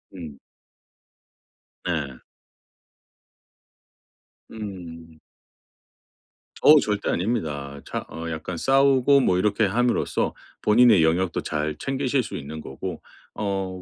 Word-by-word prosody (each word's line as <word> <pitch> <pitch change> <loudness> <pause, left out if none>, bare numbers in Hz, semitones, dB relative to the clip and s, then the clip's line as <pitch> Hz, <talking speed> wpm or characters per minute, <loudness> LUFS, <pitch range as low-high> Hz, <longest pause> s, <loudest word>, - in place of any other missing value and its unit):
음. 80 -6 -9 1.5
네. 75 -7 -3 2.3
음. 85 -7 -9 1.4
어우 150 0 +8
절대 105 -1 -2
아닙니다. 75 -9 -2
차 - - -4
어 85 0 -6
약간 80 +2 -5
싸우고 135 - +4
뭐 90 -8 +2
이렇게 105 +3 +2
함으로써 120 +5 0 0.3
본인의 110 -4 +5
영역도 85 +3 +1
잘 75 0 -2
챙기실 135 - -1
수 - - -7
있는 75 +3 -7
거고 65 - -7 0.3
어 95 -3 -3
95 Hz, 180 characters per minute, -24 LUFS, 80-120 Hz, 2.3 s, 어우